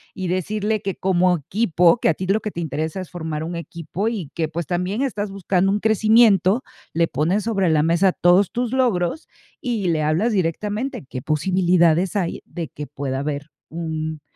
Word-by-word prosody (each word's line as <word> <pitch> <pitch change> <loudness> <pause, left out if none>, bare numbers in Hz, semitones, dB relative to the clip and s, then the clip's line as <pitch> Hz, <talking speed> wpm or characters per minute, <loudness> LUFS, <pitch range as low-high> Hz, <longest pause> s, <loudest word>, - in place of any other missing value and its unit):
y 185 -2 -3
decirle 210 +4 -1
que, 195 -1 -3
como 180 -1 +2
equipo, 175 - +2
que - - +2
a - - +4
ti 185 - -4
lo 200 +3 +2
que 210 - -3
te 170 - -5
interesa 160 +4 -3
es 185 - -9
formar 160 -3 -4
un 170 +2 -4
equipo 170 +4 -4
y 200 -11 -3
que, 165 -2 -1
pues, 165 +2 -4
también 180 - -1
estás 210 -6 -2
buscando 195 -1 +1
un 205 - +1
crecimiento, 220 - +4 0.3
le 165 +1 +2
pones 165 +10 0
sobre 195 -6 +1
la 155 -2 +3
mesa 170 +3 +3
todos 180 +3 +4
tus 240 -1 -2
logros, 245 - 0 0.3
y 230 - -1
le 160 -2 +1
hablas 155 +10 +1
directamente. 205 - -2
¿Qué 130 -1 -6
posibilidades 175 +2 +2
hay 185 -4 -1
de 170 -4 -6
que 150 -2 -7
pueda 135 -1 -4
haber 145 +1 -4 0.2
un 160 -2 -4
180 Hz, 185 wpm, -22 LUFS, 160-205 Hz, 0.3 s, a